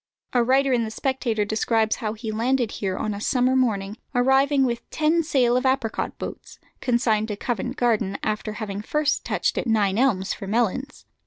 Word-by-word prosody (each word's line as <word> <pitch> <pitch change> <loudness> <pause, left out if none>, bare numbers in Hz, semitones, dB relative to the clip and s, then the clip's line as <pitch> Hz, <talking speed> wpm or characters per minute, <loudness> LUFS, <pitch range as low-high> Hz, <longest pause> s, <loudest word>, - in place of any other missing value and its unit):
A 245 -1 +4
writer 265 +2 +3
in 240 -2 +2
the 220 - -3
Spectator 230 -3 -1
describes 220 +1 +1
how 215 -4 -3
he 220 0 -5
landed 240 +1 0
here 190 -2 -3
on 215 - -2
a 200 - -6
summer 255 +1 +2
morning, 210 -5 0 0.2
arriving 270 +2 +4
with 235 -2 -3
ten 315 +2 +2
sail 260 -6 +2
of 250 - +1
apricot 260 -4 -1
boats, - - -8 0.2
consigned 235 -4 +1
to 210 - -3
Covent 240 +3 -3
Garden, 220 -5 +1
after 215 0 -2
having 205 -2 -5
first 300 +6 0
touched - - 0
at - - -3
Nine 210 -2 +2
Elms 205 -7 +2
for 195 - -8
melons. 240 +6 -1
235 Hz, 180 wpm, -24 LUFS, 215-260 Hz, 0.2 s, A